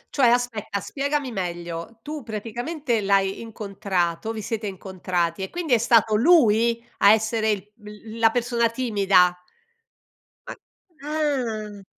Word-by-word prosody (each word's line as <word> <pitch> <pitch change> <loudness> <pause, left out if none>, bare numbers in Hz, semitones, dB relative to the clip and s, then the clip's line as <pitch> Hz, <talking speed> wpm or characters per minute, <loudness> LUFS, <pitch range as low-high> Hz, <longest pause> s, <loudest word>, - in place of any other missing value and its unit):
Cioè, 270 -4 +4
aspetta, 235 -4 0
spiegami 280 +4 -2
meglio. 175 0 -5
Tu 300 0 -6
praticamente 235 +4 -3
l'hai 195 -1 +1
incontrato, 200 -3 -2
vi 220 -2 -6
siete 220 0 -3
incontrati 185 -2 -3
e 190 - -4
quindi 345 -6 -2
è 235 - +5
stato 225 -2 +4
lui 235 -4 +4
a 200 +1 +7
essere 220 0 0
il 205 -1 -2
l 210 +2 -11
la 225 -1 +5
persona 235 0 0
timida? 200 -7 +3 1.1
Ma - - -6 0.5
ah. 240 -10 -2
220 Hz, 125 wpm, -24 LUFS, 200-240 Hz, 1.1 s, a